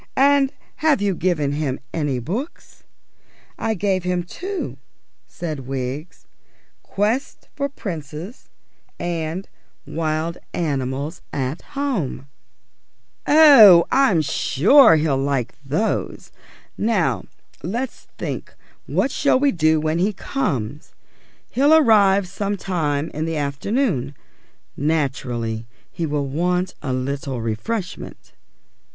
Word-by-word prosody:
And 275 0 +4 0.3
have 310 -4 +3
you 200 -1 +1
given 170 -5 0
him 145 -3 -2
any 145 -5 -1
books?" 205 - -6 0.7
"I 225 -1 0
gave 190 -1 0
him 180 -1 -1
two," 375 - -5 0.5
said 155 -7 -6
Wiggs. 135 +5 -5 0.6
"Quests 220 +7 -2
for 280 -1 -1
Princes, 170 - -7 0.5
and 170 +2 -3 0.4
Wild 160 +1 -2 0.2
Animals 140 0 -2
at 135 +2 -3 0.2
Home." 240 - -2 1.0
"Oh, 240 - +9
I'm 255 - +4
sure 175 - +5
he'll 150 -3 +1
like 135 -4 -1
those. 155 +11 -2 0.5
Now 175 - +1 0.4
let's 235 - -4
think - - -5 0.3
what 270 - 0
we - - -7
shall 280 -3 +3
do 160 - +3
when 155 +2 0
he 200 +4 +1
comes. 150 - -3 0.6
He'll 285 +5 +5
arrive 200 -9 +5
some 200 +2 -3
time 160 -6 -1
in 155 +1 -2
the 165 -1 -2
afternoon. 145 - -1 0.6
Naturally 125 -7 -2 0.2
he 165 - -3
will 145 -1 -1
want 180 +5 0
a 135 - -3
little 130 0 -3
refreshment." 145 - -4
165 Hz, 105 wpm, -21 LUFS, 140-210 Hz, 1.0 s, Oh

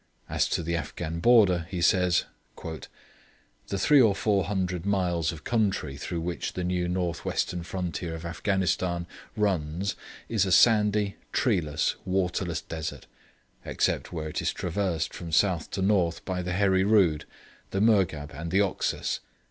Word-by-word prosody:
As - - 0
to - - -1
the 85 +1 -1
Afghan 85 +1 -4
border 95 -6 +4
he 90 - -4
says: 90 +1 +3 0.3
'The 80 +4 -10
three 140 +8 +5
or 110 -5 +4
four 100 -2 +1
hundred 90 -2 -2
miles 90 -5 0
of 80 -3 -10
country 100 - 0
through 85 +4 -4
which 85 +1 -3
the 90 - -3
new 90 0 0
north 90 -2 -2
western 90 - -1
frontier 85 -1 -4
of 80 +1 -8
Afghanistan 90 0 -1 0.3
runs 95 -2 0 0.3
is 110 -4 +1
a 95 - -1
sandy, 105 0 +4
treeless, 80 - +1
waterless 90 -3 -1
desert, 80 -1 -6 0.6
except - - -1
where 80 -2 -4
it - - -3
is - - 0
traversed 90 -2 -2
from 85 -1 -7
south 85 -1 +2
to 95 - -2
north 90 -5 +1
by 90 -1 -2
the 90 0 -3
Heri 95 0 +3
Rood, 95 -7 +3 0.4
the 95 - -2
Murghab 95 -9 +2
and 85 +4 -5
the 95 +4 +2
Oxus. 100 -2 0
90 Hz, 150 wpm, -27 LUFS, 85-100 Hz, 0.6 s, three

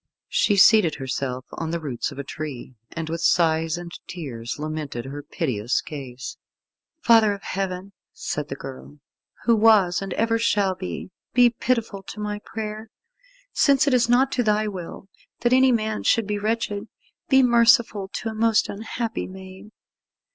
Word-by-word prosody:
She 205 - +2
seated 200 -4 +6
herself 130 -1 -4
on 165 - -4
the 170 +1 -2
roots 140 -4 -3
of 140 - -11
a 140 - -4
tree, 140 -3 -7 0.2
and 165 -1 -4
with 165 +1 -3
sighs 165 -1 +2
and 175 -1 -8 0.2
tears 125 -9 -6
lamented 150 -5 -4
her 140 +2 -6
piteous 130 -6 -1
case. 130 -4 -7 0.7
"Father 225 -3 +5
of 200 - -9
Heaven," 190 0 -4 0.2
said 150 -1 -4
the 135 - -5
girl, 135 +2 -10 0.5
"Who 235 - +4
was 210 -5 +4
and 195 -1 -5
ever 230 0 +1
shall 205 -4 +2
be, 185 0 -6 0.2
be 245 -1 +6
pitiful 230 -4 -1
to 205 - -10
my 210 0 -3
prayer. 215 0 -6 0.6
Since 280 -1 +4
it 280 - +2
is 240 -2 +3
not 260 +3 +4
to 250 - +1
Thy 215 -1 +1
will 190 -1 -7 0.3
that 240 +1 +2
any 260 0 +5
man 220 -2 0
should 230 - +2
be 205 0 -2
wretched, 215 -1 -2 0.4
be 265 -1 +6
merciful 235 -4 +4
to 225 - -4
a - - -5
most 225 0 +2
unhappy 225 +2 -4
maid. 190 +2 -11
195 Hz, 160 wpm, -24 LUFS, 155-225 Hz, 0.7 s, seated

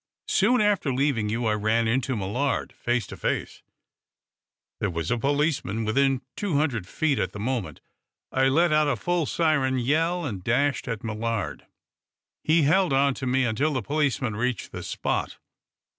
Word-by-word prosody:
Soon 235 +4 +3
after 205 -9 +2
leaving 130 -5 +1
you 115 +2 -1
I 110 - +2
ran 110 +2 +1
into 130 +2 0
Millard, 115 +8 -1
face 120 -3 -1
to - - -9
face, - - -3 1.2
There 100 - 0
was 85 -2 -3
a 120 - +2
policeman 140 - 0
within 135 +4 +2
two 200 -7 -2
hundred 125 - 0
feet 150 +3 0
at 95 - -2
the 105 - -7
moment. 105 - -3 0.5
I 130 0 +3
let 155 +4 +3
out 155 0 +4
a 145 - +1
full 175 -4 -1
siren 145 -6 +1
yell 165 +7 +1
and 100 -9 -5
dashed 140 +7 +1
at 115 -3 -4
Millard. 110 -1 -3 0.8
He 160 0 +3
held 170 +2 +3
on 140 +1 +3
to 130 0 -5
me 130 +1 +2
until 135 +7 0
the 130 -4 -2
policeman 140 -4 0
reached 125 0 -2
the - - -6
spot. - - -2
130 Hz, 165 wpm, -25 LUFS, 115-150 Hz, 1.2 s, out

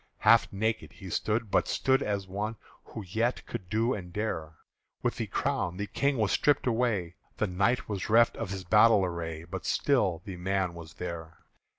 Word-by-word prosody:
Half 115 +2 +5
naked 110 +3 -2
he 95 0 -9
stood, 110 +2 -1
but - - +3
stood 135 +1 +2
as 100 -2 -1
one 105 +4 -3 0.3
Who 110 - -7
yet 115 +7 -1
could 90 -2 -7
do 115 +4 +1
and 90 -6 -6
dare; 80 -6 -3 0.5
With - - 0
the - - -2
crown, 90 0 -1
the 100 - -2
King 140 +5 0
was 105 -3 +1
stript 145 -1 +2
away 110 -8 0 0.2
The - - +1
Knight 100 +6 +1
was 100 -2 -3
reft 115 +2 +5
of - - -4
his 95 -1 -4
battle 105 +2 +5
array 80 -2 -4
But 90 +1 -6
still 100 - +1
the 95 -3 -6
Man 95 0 0
was 80 -3 -10
there. 85 -1 -7
100 Hz, 185 wpm, -29 LUFS, 90-110 Hz, 0.5 s, Half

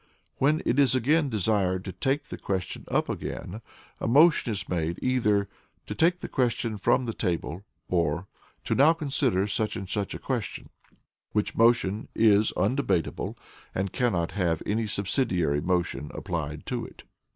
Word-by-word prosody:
When 150 +3 +2
it 130 - +2
is 135 -2 +5
desired 110 - +1
to 95 - -4
take 135 - -1
the - - -6
question 95 -2 -3
up - - +1
again, 105 +6 -5 0.4
a - - -2
motion 145 0 +5
is 100 -3 -2
made, 85 -1 -1
either 105 -6 +2 0.4
"to - - -5
take 175 +2 +2
the - - -4
question 115 -4 -1
from 125 - +2
the 115 - -3
table," 90 -1 -3 0.2
or 85 0 0 0.4
"to - - -1
now 150 +5 +6
consider 135 - +1
such 105 +1 -1
and 95 - -5
such 100 +1 -2
a - - -3
question;" 120 -7 -4 0.6
which 105 -1 0
motion 115 -3 +3
is 110 -1 +4
undebatable, 100 - 0 0.4
and 95 0 -2
cannot 95 -9 0
have 85 -5 0
any 110 +1 0
subsidiary 90 - 0
motion 85 -5 -1
applied 75 -3 -4
to - - -3
it. - - -11
105 Hz, 150 wpm, -27 LUFS, 90-125 Hz, 0.6 s, now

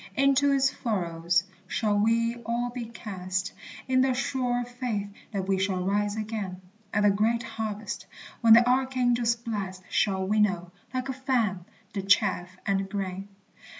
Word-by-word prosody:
Into 275 +1 +4
its 270 -1 +3
furrows 170 -6 0 0.2
shall 210 +1 +1
we 230 +3 +2
all 240 +2 -1
be 245 -1 -5
cast, 190 -4 -4 0.3
In 255 0 +4
the 260 -1 +2
sure 250 -2 0
faith 240 -4 -3 0.2
that 195 -3 -2
we 195 -1 +2
shall 190 -1 0
rise 205 +1 +1
again 215 -4 -4 0.3
At 210 - +1
the 205 - +6
great 225 +4 +1
harvest, 220 -2 -5 0.3
when 230 -2 +7
the 235 +2 +7
archangel's 250 -2 +2
blast 205 -6 -5
Shall 190 -2 +1
winnow, 190 -4 +1 0.2
like 255 +1 -2
a - - 0
fan, 240 -9 0 0.3
the 200 - -2
chaff 190 -2 +2
and 195 -1 0
grain. 195 -1 -4
215 Hz, 150 wpm, -27 LUFS, 195-245 Hz, 0.3 s, when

